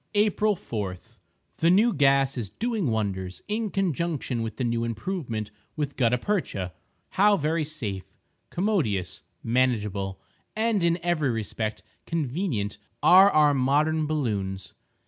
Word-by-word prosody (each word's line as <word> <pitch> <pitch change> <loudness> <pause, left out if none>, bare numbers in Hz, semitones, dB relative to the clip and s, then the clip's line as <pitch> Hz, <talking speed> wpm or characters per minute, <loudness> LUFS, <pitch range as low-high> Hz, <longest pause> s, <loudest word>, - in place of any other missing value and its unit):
April 210 0 +3
4.—The 105 - -5
new 210 +6 +5
gas 135 -2 +3
is 115 -6 -4
doing 220 - -2
wonders, 95 -5 -2
in 215 +1 -1
conjunction 170 -9 -1
with 110 -1 -4
the - - -1
new 115 -1 0
improvement 115 - -3 0.2
with 145 -2 -3
gutta 125 -1 +2
percha. 120 - -2 0.4
How 205 +1 +4
very 155 +1 0
safe, 115 -11 -5 0.3
commodious, 155 - 0 0.2
manageable, 105 -6 0 0.4
and 220 -3 +1
in 170 0 +3
every 170 -5 +1
respect 110 -1 -3 0.2
convenient 140 - -2 0.2
are 190 +2 +8
our 150 -4 +4
modern 150 +4 +2
balloons! 100 -11 -2
140 Hz, 120 wpm, -26 LUFS, 110-175 Hz, 0.4 s, are